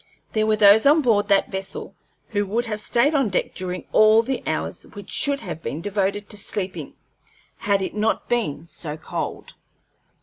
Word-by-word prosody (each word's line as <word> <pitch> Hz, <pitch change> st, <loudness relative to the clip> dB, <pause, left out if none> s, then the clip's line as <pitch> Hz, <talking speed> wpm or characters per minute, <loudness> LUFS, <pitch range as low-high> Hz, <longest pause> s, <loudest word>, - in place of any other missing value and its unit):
There 215 Hz, 0 st, +1 dB
were 215 Hz, -, +3 dB
those 210 Hz, +4 st, +6 dB
on 300 Hz, +2 st, +5 dB
board 215 Hz, -5 st, +2 dB
that 200 Hz, -1 st, +3 dB
vessel 190 Hz, 0 st, -5 dB, 0.4 s
who 205 Hz, -1 st, 0 dB
would 230 Hz, +5 st, -1 dB
have 215 Hz, -2 st, -3 dB
stayed 245 Hz, +8 st, +2 dB
on 270 Hz, -7 st, +2 dB
deck 185 Hz, -, -1 dB
during 185 Hz, -1 st, -5 dB
all 215 Hz, +1 st, +6 dB
the 265 Hz, +2 st, -3 dB
hours -, -, -3 dB
which 205 Hz, -3 st, -10 dB
should 280 Hz, -1 st, +1 dB
have 170 Hz, -4 st, -6 dB
been 150 Hz, -, -4 dB
devoted 205 Hz, +2 st, -2 dB
to 210 Hz, -, -3 dB
sleeping, 195 Hz, -2 st, -3 dB, 0.6 s
had 200 Hz, -1 st, +1 dB
it -, -, -4 dB
not 215 Hz, +1 st, -1 dB
been 190 Hz, -11 st, -1 dB
so 155 Hz, -2 st, -6 dB
cold. -, -, -5 dB
205 Hz, 175 wpm, -23 LUFS, 190-225 Hz, 0.6 s, those